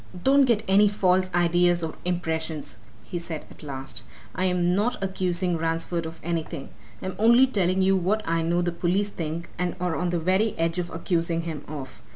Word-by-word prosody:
"Don't 275 +1 +5
get 230 -4 +2
any 200 +2 +6
false 185 -2 +2
ideas 175 0 +3
or 160 - -3
impressions," 160 -7 -2 0.2
he 175 - -5
said 165 -2 -6
at - - -15
last. 135 -5 -6 0.3
"I'm 180 -1 +1
not 215 +6 +1
accusing 185 -2 0
Ransford 165 +1 -1
of 160 - -9
anything. 160 -4 -3 0.3
I'm 190 -1 -4
only 235 +4 +7
telling 190 -6 +1
you 195 +1 +4
what 195 +4 0
I 165 0 +1
know 170 +2 +1
the 175 - 0
police 185 +4 0
think 165 -2 -5
and 180 -1 -1
are 180 -2 -1
on 180 +1 -1
the 175 - 0
very 190 +6 +1
edge 165 +1 0
of 175 -1 -3
accusing 165 0 -1
him 160 -3 -5
of. 145 -3 -8
175 Hz, 185 wpm, -25 LUFS, 165-190 Hz, 0.3 s, only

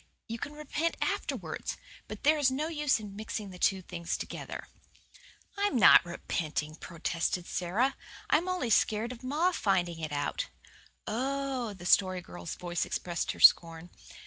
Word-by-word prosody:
You 230 +1 -5
can 295 - -5
repent 300 +2 -2
afterwards, - - -3 0.3
but - - -8
there 305 +1 +4
is 280 -3 +4
no 295 +5 -2
use 295 -6 +1
in 205 -2 -9
mixing 210 -1 -5
the 180 - -11
two 190 0 +2
things 170 -1 -3
together." - - -6 0.9
"I'm 405 -6 0
not 230 - +8
repenting," 155 -3 -3
protested 170 +2 -2
Sara. 210 +12 0 0.3
"I'm 335 +5 +2
only 320 -11 -1
scared 220 +2 +2
of 250 0 -10
ma 305 +8 +2
finding 180 - 0
it 155 -2 -4
out." 145 -1 -2 0.6
"Oh!" 260 -1 -2
The 175 -2 -11
Story 185 0 +4
Girl's 85 - -7
voice 175 -1 -2
expressed 175 -1 -2
her - - -13
scorn. 165 +1 +5
210 Hz, 150 wpm, -30 LUFS, 175-275 Hz, 0.9 s, not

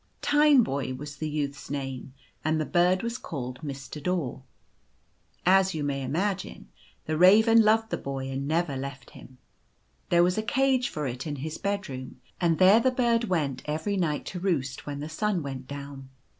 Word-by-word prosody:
Tineboy 250 - +3
was 145 +1 -8
the 155 +2 -3
youth's 145 -2 -4
name; 135 -2 -5 0.3
and 155 0 +1
the 155 - 0
bird 180 +4 +2
was 235 +2 -3
called 125 -5 -6
Mr. 140 -1 -7
Daw. 160 -7 -2 1.0
As 190 0 +4
you 155 - -2
may 140 -1 -2
imagine, 175 +9 -3 0.4
the 155 0 -2
raven 220 +5 +7
loved 220 +1 +3
the - - 0
boy 135 -1 -4
and 135 +1 -3
never 160 -2 0
left 135 0 -7
him. 130 - -14 0.7
There 175 0 +5
was 180 +4 +2
a - - +1
cage 260 +2 +1
for 150 -1 -4
it 125 +3 -4
in 145 - -3
his 155 +3 -5
bedroom, 150 -12 -4 0.2
and 170 -3 +2
there 190 +4 +7
the 260 - +3
bird 235 -2 +1
went 155 - -1
every 160 +7 -2
night 165 -6 -1
to 180 - -5
roost 155 -9 -2
when 145 -1 -4
the 150 - -4
sun 185 +2 -1
went 135 -2 -6
down. 140 -1 -8
155 Hz, 175 wpm, -27 LUFS, 140-195 Hz, 1.0 s, raven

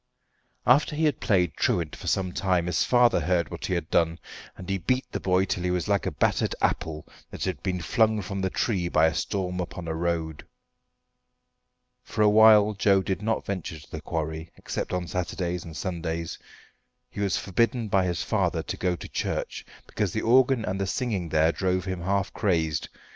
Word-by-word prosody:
After 145 +4 +4
he 160 +1 +1
had 150 - +1
played 90 -6 +2
truant 85 -4 0
for - - -9
some 95 -2 0
time 90 -2 +1
his 90 -1 +1
father 120 -4 +4
heard 85 -1 0
what - - -5
he 90 - 0
had 85 -2 -2
done, 85 0 +2 0.4
and 90 - -9
he 95 0 -1
beat 130 +9 0
the - - -3
boy 95 0 +2
till 90 - -2
he 90 - 0
was 90 -2 -1
like 100 -1 +1
a - - -1
battered - - +1
apple 75 -1 -1 0.2
that - - -6
had 95 - -2
been 90 -2 -2
flung 110 +5 +2
from 100 +2 -4
the 95 - 0
tree 90 -4 -1
by 80 -1 +4
a 80 - +2
storm 90 -1 -2
upon 90 -1 -5
a 80 - -2
road. 80 -2 -2 1.6
For 105 - -1
a 105 - +6
while 110 0 +7
Joe 100 -1 +3
did 95 0 -2
not 110 +1 -1
venture 90 -5 -4
to 70 - -17
the - - -6
quarry 80 0 -4
except - - -4
on 90 -1 -1
Saturdays 90 -1 -3
and 80 -2 -9
Sundays. 85 -3 -4 0.7
He - - -8
was 100 -2 +1
forbidden 115 +4 0
by 95 -2 +2
his 90 -2 -1
father - - 0
to - - -5
go 90 -1 0
to - - -9
church, - - -3 0.2
because - - -2
the - - -1
organ 125 0 +4
and 95 +1 -2
the 95 - -1
singing 100 -6 -2
there 80 +1 +3
drove 95 0 -1
him 95 -2 -3
half 100 +2 -1
crazed. 80 -5 0
90 Hz, 195 wpm, -26 LUFS, 85-100 Hz, 1.6 s, while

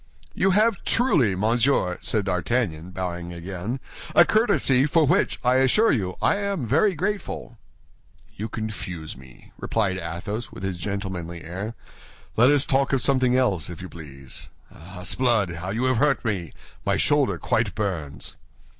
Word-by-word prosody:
"You 195 - +2
have 210 +2 +3
truly, 145 - +2
monsieur," 110 -2 +2
said 105 -3 -1
D'Artagnan, 90 -2 -1
bowing 90 -2 -4
again, 90 +8 -5 0.4
"a 175 - +8
courtesy, 200 - +3
for 160 +1 +3
which, - - +2
I 125 +1 +4
assure 135 - +4
you, 95 -7 -1
I - - +3
am 200 -8 -2
very 165 - +3
grateful." 185 - -3 0.8
"You 110 +3 -5
confuse 95 -8 -5
me," 65 -1 -16
replied 100 -5 0
Athos, 90 +7 -5
with - - -10
his 95 -2 -3
gentlemanly 90 -3 -4
air; 100 +7 -5 0.6
"let 120 +3 +6
us 145 -1 +4
talk 135 0 +1
of 135 - +2
something 130 -2 +3
else, 100 - +1
if 85 - -8
you 95 0 -7
please. 70 -5 -8 0.2
Ah, 90 +3 -11
s'blood, 110 -6 +1
how 90 +2 -5
you 110 +5 -1
have 130 -2 +2
hurt 140 -1 +2
me! 95 -7 -2 0.3
My - - +1
shoulder - - +2
quite - - 0
burns." 85 -10 -3
105 Hz, 155 wpm, -24 LUFS, 90-130 Hz, 0.8 s, a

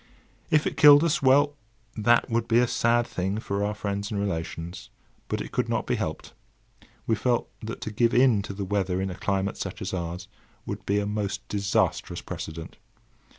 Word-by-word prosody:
If 150 -1 +3
it - - -2
killed 145 0 +8
us! 165 -3 +1
well, 140 +2 +4 0.4
that 120 +2 +3
would 115 0 -1
be 115 - +3
a 125 - +5
sad 120 0 +2
thing 95 -1 -2
for 100 -2 -2
our 105 0 -1
friends 100 0 -3
and 105 - -2
relations, 85 -3 -4 0.4
but - - -2
it - - -7
could - - -1
not - - 0
be - - 0
helped. - - -4 0.7
We 115 - +1
felt 120 +2 0
that 110 +1 -6
to 110 - -4
give 115 +2 +2
in 125 -4 +5
to 100 - -6
the 100 0 -3
weather 95 -2 0
in 95 0 -2
a - - -6
climate 100 +1 -1
such 95 - -5
as 95 - -4
ours 90 0 -4 0.4
would - - -6
be 100 - +2
a 100 - -1
most 105 -1 -3
disastrous 100 -1 0
precedent. 80 0 -7
105 Hz, 195 wpm, -26 LUFS, 95-115 Hz, 0.7 s, killed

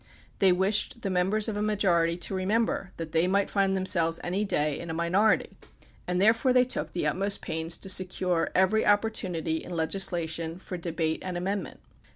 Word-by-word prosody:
They 190 -2 +5
wished 200 +5 +1
the 195 - -1
members 190 +4 +1
of 220 - -3
a 205 - -2
majority 175 -6 +1
to 180 - -2
remember 195 +1 -1
that 165 -1 -6
they 165 +2 +2
might 200 +1 +1
find 195 -1 +1
themselves 170 -3 +1
any 185 +4 -1
day 150 -7 -1
in 170 - -7
a 160 - -3
minority, 180 +6 +1 0.5
and 180 0 -1
therefore 225 +6 +3
they 250 0 +5
took 255 - -3
the 175 - -2
utmost 195 +7 -1
pains 160 +1 +1
to - - -5
secure 185 -2 +1
every 190 +4 +3
opportu 210 -1 +1
nity 160 -2 -2
in - - -11
legislation 165 -1 -1
for 185 0 -8
debate 165 -2 -2
and 185 -1 -4
amendment. 190 +1 -4
185 Hz, 185 wpm, -27 LUFS, 170-200 Hz, 0.5 s, They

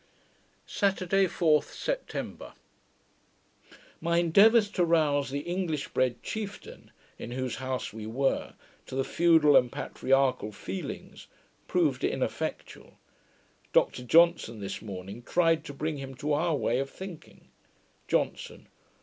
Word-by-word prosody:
Saturday, 195 -1 +1
4th 155 -3 +2
September - - -5 1.5
My 170 0 0
endeavours 205 +6 +5
to 180 - +1
rouse 150 -5 +2
the 140 +1 -3
English 175 -3 -3
bred 125 -2 0
chieftain, 210 -2 -7 0.3
in - - -6
whose 130 0 -3
house 130 -2 -4
we 110 -1 -7
were, 135 +4 -1 0.3
to - - -7
the 135 - +1
feudal 160 -2 +4
and 125 -2 +5
patriarchal 130 -5 0
feelings, 95 -1 -7 0.4
proving 150 -8 +1
ineffectual, - - -4 0.8
Dr - - +2
Johnson 165 -6 +4
this 100 -1 -5
morning 100 +1 -8
tried 165 +3 +2
to - - -6
bring 155 +2 -3
him 135 -1 -7
to 145 +4 -2
our 160 +2 +1
way 125 -3 0
of 135 0 -2
thinking. 185 -2 -11 0.6
JOHNSON. - - -2
150 Hz, 120 wpm, -28 LUFS, 130-170 Hz, 1.5 s, endeavours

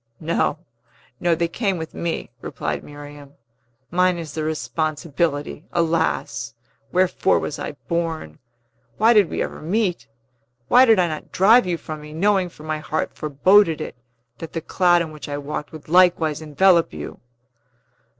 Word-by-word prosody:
"No, 160 -1 0 0.6
no; 170 -1 +2
they 170 +1 0
came 195 +2 -1
with 160 -1 -6
me," 170 -1 -4
replied - - -4
Miriam. 145 -1 -12 0.6
"Mine 180 0 +2
is 160 -4 -7
the 155 - -3
responsibility! 155 -1 -2
Alas! 160 - -1 0.4
wherefore 185 +1 +2
was 150 - -4
I - - -4
born? 165 - -3 0.6
Why 225 +3 +5
did 210 -6 +5
we - - -1
ever - - -7
meet? 180 - -1 0.6
Why 255 +1 +7
did 225 -4 +5
I 180 -1 +3
not 155 -2 -6
drive 215 +3 +5
you 175 -2 0
from 155 -1 -7
me, 150 0 -10
knowing 190 +2 +2
for 155 - -15
my 155 0 -3
heart 155 +1 -3
foreboded 165 +4 +3
it 155 - -6 0.4
that 165 - -8
the 165 - -2
cloud 175 +1 +3
in 160 - -7
which 150 -1 -9
I 145 - -3
walked 145 +1 -5
would 155 -2 -11
likewise 165 -3 +3
envelop 170 - +3
you!" 75 -1 -7
165 Hz, 155 wpm, -22 LUFS, 150-180 Hz, 0.6 s, Why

